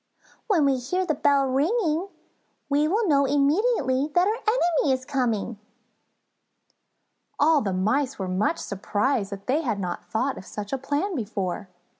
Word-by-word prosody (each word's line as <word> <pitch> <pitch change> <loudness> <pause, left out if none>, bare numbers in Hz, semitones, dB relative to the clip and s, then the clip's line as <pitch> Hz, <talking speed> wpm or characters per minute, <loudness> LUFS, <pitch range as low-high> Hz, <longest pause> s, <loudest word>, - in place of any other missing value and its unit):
When 355 -10 +3
we 275 -1 +3
hear 360 +10 -1
the 310 - +1
bell 280 -1 +3
ringing 320 - +1 0.6
we 295 +2 +2
will 420 +6 +1
know 280 -3 +4
immediately 285 - +2
that 355 +2 +4
our 425 - +2
enemy 430 - +1
is 260 0 -3
coming." 235 -6 -1 1.8
All 300 0 +4
the 200 - -1
Mice 255 +9 0
were 190 - -3
much 200 - 0
surprised 205 +2 -1
that 200 0 -7
they 285 +5 +1
had 230 -9 -2
not 180 -2 -4
thought 255 +5 -1
of 185 - -12
such 210 +3 -6
a 270 - -1
plan 290 +9 -1
before. 200 - -3
275 Hz, 155 wpm, -25 LUFS, 220-320 Hz, 1.8 s, know